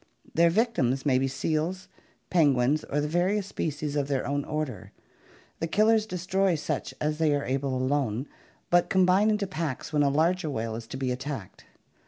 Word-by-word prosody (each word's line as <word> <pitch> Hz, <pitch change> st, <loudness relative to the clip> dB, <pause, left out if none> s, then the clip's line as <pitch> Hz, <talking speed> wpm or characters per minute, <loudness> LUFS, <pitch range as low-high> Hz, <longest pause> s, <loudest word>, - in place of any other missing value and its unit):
Their 170 Hz, +1 st, +5 dB
victims 165 Hz, -, +1 dB
may 130 Hz, -3 st, +3 dB
be 135 Hz, -, +1 dB
seals, 155 Hz, +7 st, -2 dB, 0.4 s
penguins, 145 Hz, -3 st, +3 dB
or 145 Hz, -, -1 dB
the 150 Hz, -, -1 dB
various 180 Hz, +5 st, +1 dB
species 150 Hz, -6 st, -3 dB
of 140 Hz, -2 st, 0 dB
their 135 Hz, -2 st, -1 dB
own 145 Hz, 0 st, -1 dB
order. 150 Hz, -9 st, -4 dB, 0.7 s
The 165 Hz, -, -1 dB
killers 215 Hz, +4 st, +3 dB
destroy 185 Hz, 0 st, 0 dB
such 150 Hz, -, -3 dB
as 150 Hz, +1 st, -1 dB
they 155 Hz, -2 st, +3 dB
are 140 Hz, -, -2 dB
able 135 Hz, 0 st, -1 dB
alone, 130 Hz, -1 st, 0 dB, 0.4 s
but 175 Hz, 0 st, +4 dB
combine 190 Hz, +3 st, +4 dB
into 210 Hz, -1 st, +1 dB
packs 160 Hz, -5 st, -4 dB
when 150 Hz, -, +3 dB
a 140 Hz, -, +4 dB
larger 165 Hz, +4 st, +1 dB
whale 115 Hz, -4 st, -3 dB
is 115 Hz, 0 st, -7 dB
to 130 Hz, -, -6 dB
be 130 Hz, -1 st, -1 dB
attacked. 130 Hz, -5 st, -6 dB
150 Hz, 175 wpm, -27 LUFS, 135-180 Hz, 0.7 s, Their